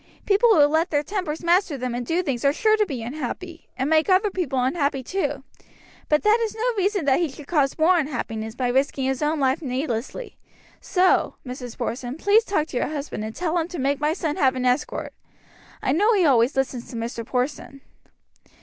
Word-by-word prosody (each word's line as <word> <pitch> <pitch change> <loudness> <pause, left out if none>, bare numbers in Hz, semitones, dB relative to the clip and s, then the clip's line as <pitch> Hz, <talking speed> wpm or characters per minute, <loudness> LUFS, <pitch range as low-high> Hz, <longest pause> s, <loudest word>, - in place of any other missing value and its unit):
People 430 +2 +4
who 295 -3 +7
let 315 +4 +1
their 290 -1 +1
tempers 350 -3 -4
master 345 -3 +2
them 250 -1 -3
and 245 +1 -3
do 335 +9 0
things 265 -7 -2
are 280 - +4
sure 435 +7 +3
to 425 -1 +1
be 255 -8 -5
unhappy, 310 +7 -6
and 265 +1 0
make 320 +3 +3
other 385 +2 +3
people 325 -9 -2
unhappy, 280 -1 0
too; 290 -4 -2 0.7
but 300 0 +2
that 430 +2 +4
is 445 - -3
no 475 +2 0
reason 395 -3 0
that 265 -2 +3
he 340 -3 0
should 275 +2 -11
cause 280 -4 +1
more 345 +3 +4
unhappiness 225 -6 -4
by 250 0 -1
risking 270 +1 0
his 265 +1 -1
own 305 +1 0
life 265 +2 +1
needlessly, 260 - -4 0.4
so, 370 0 +2
Mrs. 250 -2 -7
Porson, 245 +3 -4
please 410 +6 +4
talk 385 -8 0
to - - -4
your - - 0
husband 290 -7 -5
and 220 +1 -6
tell 345 -1 0
him 325 - -2
to 360 - -7
make 275 +1 0
my 300 +1 +1
son 320 -4 -3
have 265 -2 +3
an 255 0 -2
escort. 250 +4 -1 0.7
I - - +1
know 415 - +3
he 375 -4 +3
always 250 -2 +3
listens 260 -2 -2
to - - -8
Mr. 230 0 -4
Porson.'" 265 +3 -3
295 Hz, 205 wpm, -23 LUFS, 260-355 Hz, 0.7 s, who